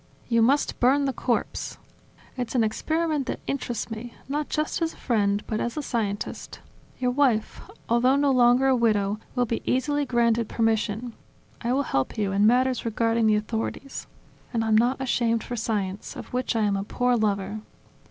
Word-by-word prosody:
"You 230 -1 +3
must 275 +6 +2
burn 275 +3 +4
the 270 - 0
corpse. 240 -1 -2 0.6
It's 250 -1 -4
an 240 - +4
experiment 305 +5 -1
that - - -3
interests 240 -4 -3
me, 230 +2 -7
not 295 +2 -2
just 310 +2 -1
as 330 0 0
a - - -18
friend 205 -4 +1
but 215 - -2
as 240 +5 -3
a 300 - -2
scientist. 210 -6 -3 0.4
Your 250 -1 0
wife, 250 -5 +1 0.3
although 245 +3 +3
no 280 0 +3
longer 250 0 +5
a 265 -1 +4
widow, 210 -3 +1 0.2
will 245 -1 +2
be 230 0 -2
easily 290 +3 0
granted 235 -2 +2
permission; 225 +1 0 0.5
I 235 - -1
will 280 +2 +2
help 135 - -1
you 205 -2 0
in 200 +2 +4
matters 255 +2 +3
regarding 230 0 +1
the 215 - +4
authorities. 225 +5 -4 0.4
And 225 -2 0
I'm 220 -1 +3
not 240 +5 +3
ashamed 235 -3 +1
for 245 - -5
science, 210 -4 -3
of - - -9
which 250 -1 -1
I 225 - +2
am 205 -1 +2
a 195 - -2
poor 245 +4 +1
lover. 205 -2 -1
235 Hz, 180 wpm, -25 LUFS, 220-260 Hz, 0.6 s, longer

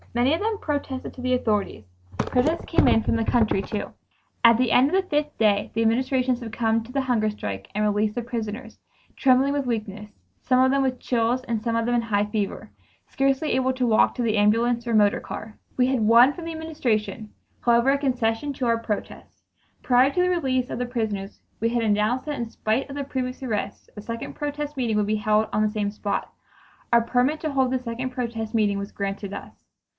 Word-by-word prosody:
Many 245 +4 +3
of 330 - -1
them 435 0 0
protested 285 -6 -4
to 255 - -10
the 255 0 +1
authorities. 210 - -1 0.3
Protests 300 +7 0
came 335 - +3
in 225 - +4
from - - 0
the 225 - +1
country, 220 -4 +2
too. 205 +1 -5 0.5
At 230 -1 +7
the 245 -2 +1
end 260 +3 +5
of 370 - 0
the 380 -1 +1
fifth 295 -1 -1
day 205 -2 +2
the 225 - +1
Administration 255 +2 +1
succumbed 225 -1 -1
to - - -11
the 275 +1 0
hunger 240 -5 +1
strike 100 - -6
and 210 - 0
released 210 0 +1
the 240 - -2
prisoners, 225 0 -5 0.4
trembling 270 +1 +3
with 280 -3 -1
weakness, 210 -3 -4 0.3
some 255 0 +2
of 260 0 +4
them 275 0 +2
with 260 -2 -1
chills 245 +1 0
and 230 -4 -2
some 230 0 -1
of 230 - 0
them 240 +1 +1
in 240 - +2
a - - -7
high 205 -2 +1
fever, 210 - -3 0.4
scarcely 270 +3 0
able 260 0 +1
even 260 - 0
to 250 -1 +1
walk 220 -1 +3
to 250 - -2
the 225 -2 +1
ambulance 230 +3 +2
or 235 - 0
motor 210 -2 +3
car. 215 0 -8 0.2
We 250 -1 +4
had 260 -3 +1
won 235 +5 +6
from 340 0 -8
the 330 - -4
Administration, 230 -10 -2 0.3
however, 235 +2 +4
a 280 - +2
concession 250 -1 -1
to 260 - -3
our 230 -1 +2
protest. 215 -3 -6 0.4
Prior 255 +1 +4
to 360 - +1
the 360 - +2
release 265 -8 0
of - - -4
the 250 - -1
prisoners 215 -5 -3 0.2
we 230 - +2
had 235 0 0
announced 215 +4 +1
that 295 -3 -4
in 235 -1 -3
spite 225 +4 -1
of 275 - -7
the 285 - -2
previous 260 -1 -4
arrests 210 -5 -4
a 210 - -7
second 230 +2 -6
protest 295 0 -4
meeting 235 -5 0
would 210 -1 +1
be 215 - +1
held 215 +1 +2
on 210 - +2
the 215 - +2
same 210 -1 -2
spot. 205 -1 -3 0.6
A 235 - +6
permit 250 +6 +1
to 310 - -2
hold 265 -2 +1
this 260 -1 -1
second 240 +2 -3
protest 235 -3 -4
meeting 205 -3 +1
was 200 +1 -6
granted 200 0 -4
us. 200 - -8
235 Hz, 220 wpm, -24 LUFS, 215-260 Hz, 0.6 s, At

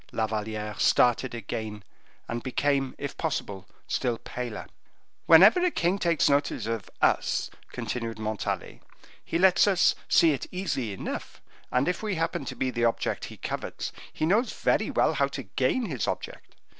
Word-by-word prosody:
La 110 - 0
Valliere 105 0 -3
started 125 0 +3
again, 110 -1 -5 0.4
and 120 0 -3
became, 135 +1 0
if 140 -1 -5
possible, 100 - -3 0.2
still 120 -2 0
paler. 120 -2 -6 0.6
"Whenever 195 - +8
a 360 - +4
king 185 - 0
takes 170 -3 +2
notice 140 -5 +1
of 115 -3 -3
us," - - +2 0.2
continued 115 -2 -4
Montalais, 110 -1 -3 0.4
"he 165 - -1
lets 185 +2 +5
us 190 -3 +4 0.2
see 165 - +6
it 140 - -3
easily 175 - -2
enough, 95 - -6 0.3
and, 125 +2 +2
if 180 - -1
we 210 -3 -2
happen 165 -3 -2
to - - -5
be 130 - -1
the 120 -1 -2
object 115 -1 0
he - - -10
covets, - - -4 0.2
he 155 - -1
knows 215 +9 +2
very - - +1
well - - +2
how - - +2
to - - -6
gain 255 -2 0
his 135 - -2
object. - - -5
130 Hz, 160 wpm, -27 LUFS, 110-170 Hz, 0.6 s, Whenever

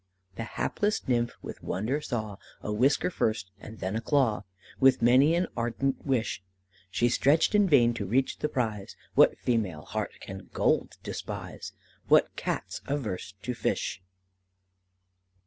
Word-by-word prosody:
"The 115 - -4
hapless 210 +1 0
nymph, 120 -2 +1
with - - -8
wonder 120 +10 -1
saw, 110 -8 -4 0.3
A 105 - -2
whisker 135 +10 +2
first, 110 - -1
and 110 +2 -10
then 95 +1 -3
a 115 - -1
claw; 120 -7 +1 0.3
With 130 -3 +5
many 130 +7 +6
an 175 +1 +2
ardent 120 +4 -1
wish 130 -8 0 0.5
She 120 +5 +2
stretched 140 - +3
in 205 -2 +4
vain 120 -6 +5
to 100 -4 -4
reach 130 +6 +1
the 150 - -1
prize; 110 -6 -2 0.2
What - - +5
female 105 -11 -1
heart - - -3
can - - -9
gold - - +1
despise? - - -6 0.3
What - - +4
Cat's - - -3
averse 110 -10 -3
to 125 +3 -2
fish? 120 - -2
120 Hz, 145 wpm, -28 LUFS, 110-135 Hz, 0.5 s, many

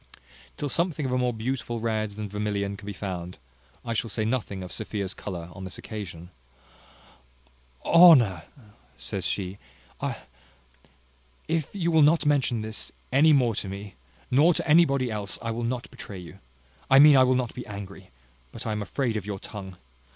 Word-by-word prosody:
Till 145 - -2
something 165 0 0
of 130 - -2
a 125 - +1
more 125 -1 +1
beautiful 120 0 -3
red 110 -1 -1
than 105 0 -5
vermilion 100 -1 -2
be 100 +1 -7
found 90 -2 -5 0.5
out, - - -7
I - - +1
shall 115 0 -1
say 110 +1 -2
nothing 110 -5 -2
of 90 - -9
Sophia's 100 +6 -4
colour 85 -4 -7
on 95 - -9
this 95 - -6
occasion. 90 -5 -8 1.5
"Ho 170 0 +9
nour," 100 - +1 0.6
says - - -3
she, 95 0 -3 0.4
"I - - -2 1.3
if 160 -2 -1
you 170 -4 0
will 160 -1 +5
not 155 +2 +4
mention 135 -6 +2
this 110 0 -3 0.2
any 150 +4 +6
more 125 -6 +4
to 100 - -4
me 100 0 -7 0.4
nor 155 +7 +5
to - - -2
anybody 140 -6 +4
else, 105 -2 -4
I 115 - -3
will 115 +1 -3
not 120 +1 -3
betray 115 -6 -9
you 90 +2 -11 0.5
I 135 - +7
mean, 145 +1 +9
I 130 - +7
will 130 0 +3
not 125 -2 -1
be 125 - -8
angry; 100 -2 -9 0.4
but - - -9
I 110 - -1
am 105 0 -2
afraid 120 +2 -2
of 105 -1 -6
your 100 -2 -3
tongue. 95 -2 -9
110 Hz, 180 wpm, -26 LUFS, 100-135 Hz, 1.5 s, Ho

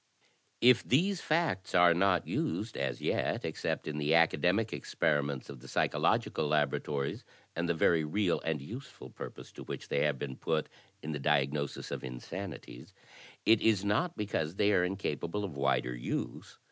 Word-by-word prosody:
"If 125 0 +6
these 180 +7 +2
facts 155 - 0
are 90 -1 +7
not 90 0 +2
used 140 -8 -2
as 65 -3 -2
yet - - 0
except - - -3
in 75 -1 -3
the 75 +2 +2
academic 90 +6 +3
experiments 70 -2 -1
of 70 -3 -9
the 65 - -13
psychological 75 +4 +1
laboratories 75 -1 0 0.3
and 85 +1 -1
the 85 - +2
very 80 0 +3
real 90 +4 0
and 80 -2 -1
useful 130 - -9
purpose - - -9
to - - -10
which - - -7
they - - +1
have 75 -3 +1
been 65 -1 -5
put 80 -1 -1 0.3
in 80 - -4
the 75 - -3
diagnosis 70 0 0
of - - -4
insanities, 65 0 -7 0.5
it 110 0 +5
is 105 -3 +3
not 160 - +1
because 95 -6 -2
they 105 +1 +3
are 90 - +4
incapable 95 0 -2
of 90 -7 -5
wider 70 -3 +1
use. - - -4
85 Hz, 160 wpm, -31 LUFS, 75-105 Hz, 0.5 s, are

